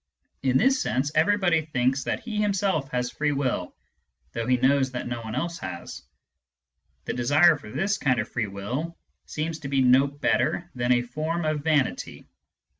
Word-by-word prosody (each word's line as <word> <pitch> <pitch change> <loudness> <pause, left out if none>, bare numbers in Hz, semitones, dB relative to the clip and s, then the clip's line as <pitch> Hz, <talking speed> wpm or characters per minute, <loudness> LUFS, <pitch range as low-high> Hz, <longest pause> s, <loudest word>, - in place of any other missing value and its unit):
In 130 -1 +2
this 265 - +3
sense, 135 +3 0
everybody 175 0 +3
thinks 130 -2 0
that - - -2
he 220 -3 -5
him 210 -1 +2
self 185 -8 0
has 125 0 -2
free 150 0 0
will, 130 -10 -2 0.6
though 115 +6 -3
he 125 0 +3
knows 130 +1 +3
that 125 - -4
no 120 -1 -4
one 110 0 -6
else 170 +6 -3
has. 85 -2 -7 1.0
The - - -2
desire 145 +7 +4
for 145 -7 -11
this 195 - -1
kind 130 -3 +2
of - - -2
free 115 -4 -2
will 125 +13 -5 0.3
seems 160 +1 -3
to 145 - -6
be 135 -1 +1
no 130 +2 +5
better 145 +4 0
than 120 0 0
a 120 -1 +3
form 155 +6 -3
of 155 -1 0
vanity. 150 -4 0
140 Hz, 180 wpm, -25 LUFS, 125-165 Hz, 1.0 s, no